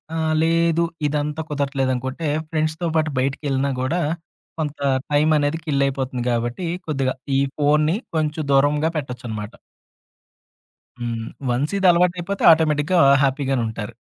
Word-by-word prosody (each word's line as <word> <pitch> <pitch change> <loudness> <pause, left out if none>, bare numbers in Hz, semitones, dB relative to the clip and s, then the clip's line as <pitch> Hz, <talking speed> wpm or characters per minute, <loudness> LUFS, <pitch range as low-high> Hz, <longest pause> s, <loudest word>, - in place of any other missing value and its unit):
ఆహ్, 160 -1 0
లేదు 165 0 +2 0.2
ఇదంతా 150 +1 -2
కుదరట్లేదనుకుంటే, 135 0 -2 0.2
ఫ్రెండ్స్‌తో 155 +2 -1
పాటు 155 -1 +1
బయటికెళ్ళినా 140 +1 -1
గూడా, 165 +7 0 0.6
కొంత 150 -1 -3 0.3
టైమనేది 150 +1 +2
కిల్ 140 -3 +1
అయిపోతుంది 130 -2 -3
గాబట్టి, 120 +8 -2 0.2
కొద్దిగా 135 -4 -1 0.2
ఈ - - +3 0.2
ఫోన్‌ని 150 +4 +2 0.2
కొంచెం 155 0 -1
దూరంగా 145 +3 +3
పెట్టొచ్చనమాట. 120 -6 -5 1.5
హ్మ్. 115 -1 -3 0.2
వన్సిది 155 +11 +1
అలవాటయిపోతే 180 +2 0
ఆటోమేటిక్‌గా 160 +2 +2 0.2
హ్యాపీ‌గానుంటారు. 130 -5 -1
145 Hz, 100 wpm, -22 LUFS, 130-160 Hz, 1.5 s, ఈ